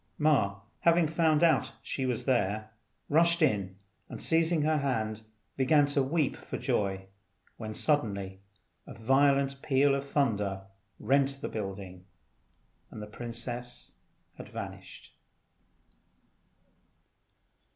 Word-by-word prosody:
Ma 105 -10 +2 0.2
having 170 0 +4
found 160 0 +2
out 165 - +3
she 130 -1 -3
was 125 -3 -2
there, 110 -4 0 0.4
rushed 170 +3 +3
in 100 -9 +1 0.3
and - - -7
seizing 165 -1 +2
her 155 0 +2
hand 110 -6 -2 0.3
began 145 +2 +4
to 145 0 +1
weep 145 +1 0
for - - -7
joy, 95 -2 -1 0.5
when 110 -2 -6
suddenly 100 -10 0 0.5
a - - -9
violent 135 +4 +2
peal 140 0 +3
of 140 0 -1
thunder 105 -9 0 0.4
rent 140 0 +2
the - - -4
building, 95 -3 -6 0.9
and - - -9
the 105 - -6
princess 120 +2 -6 0.4
had - - -10
vanished. - - -9
130 Hz, 110 wpm, -29 LUFS, 105-145 Hz, 0.9 s, having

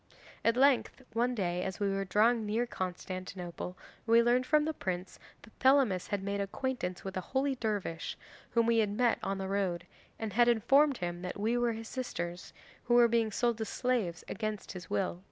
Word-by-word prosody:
At 230 +1 +3
length, 270 -1 +3
one 240 +2 +1
day 180 -4 -1
as 190 +2 -4
we 205 - +1
were 195 0 -1
drawing 220 +4 +3
near 220 +3 0
Constantinople, 185 -2 -5 0.3
we 230 +1 +6
learned 250 +2 +2
from 300 -1 +4
the 315 - -1
prince 185 -8 -4 0.2
that 220 - -16
Thelamis 260 -9 +4
had 200 -1 -2
made 200 0 -1
acquaintance 200 -3 -3
with 190 0 -6
a - - -1
holy 270 +7 0
dervish 205 -9 -3 0.3
whom 230 -1 +2
he 230 - +4
had 215 -2 +2
met 235 +3 +2
on 195 0 -2
the 190 0 -3
road, 190 -3 -1 0.3
and 220 -3 -4
had 240 +3 +5
informed 270 +5 +4
him 175 0 -4
that 180 +2 -5
we 220 +3 +1
were 240 -1 +1
his 225 0 -7
sisters, 175 -9 -5 0.3
who 240 - +3
were 240 -1 +7
being 230 -1 +1
sold 235 +1 0
as 220 - -3
slaves 230 -10 -1
against 215 -2 -4
his 180 -2 -9
will. 185 -2 -1
215 Hz, 190 wpm, -31 LUFS, 185-240 Hz, 0.3 s, were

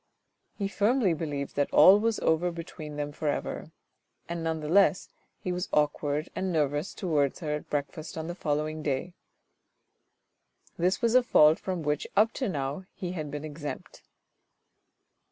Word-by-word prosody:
He 200 - -1
firmly 210 -1 +2
believed 145 -3 -4
that 145 0 0
all 190 +7 +8
was 225 0 +1
over 160 +2 +2
between 160 -3 -8
them 145 0 -3
for 150 +1 -4
ever, 145 - -2 0.6
and 170 -1 -4
none 160 -1 -1
the 150 - -5
less, 190 +2 +3 0.3
he 180 - -4
was 180 +1 -3
awkward 150 0 +1
and 190 -1 -1
nervous 150 +1 0
towards 150 -7 0
her 155 -2 -2
at 150 - -5
breakfast 150 +3 -4
on 160 - -3
the 175 - -4
following 155 -2 -2
day. 150 +4 -2 1.6
This 185 +5 0
was 230 -1 +3
a 255 - +7
fault 155 -10 +5
from 185 -4 -3
which 150 0 -1
up 220 +2 +4
to 260 - +1
now 140 +1 -3
he 185 -2 -4
had 155 -5 -4
been 145 +1 -5
exempt. 150 -1 -7
160 Hz, 160 wpm, -28 LUFS, 150-185 Hz, 1.6 s, all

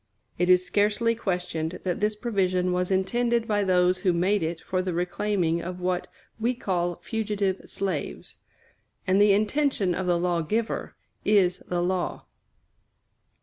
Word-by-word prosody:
It 180 0 +2
is 180 0 +5
scarcely 210 +4 +2
questioned 180 -6 -3
that 180 0 -2
this 210 0 +1
provision 185 -5 0
was 180 0 0
intended 235 +5 +1
by 205 -2 +1
those 180 -1 +3
who 180 -1 +2
made 185 +4 +2
it 165 +1 -2
for 185 -1 -2
the 185 -2 -3
reclaiming 180 -1 0
of 180 +1 -6
what 180 0 -1 0.3
we 240 +3 +1
call 175 -6 -1
fugitive 205 -3 -1
slaves; 185 -7 -4 0.7
and 190 +2 +3
the 205 -1 +6
intention 215 -2 +1
of 185 +1 -3
the 175 -1 +3
law 175 -1 0
giver 220 +8 -2 0.3
is 190 -4 +3
the 175 -1 0
law. 180 0 -2
185 Hz, 150 wpm, -26 LUFS, 180-210 Hz, 0.7 s, the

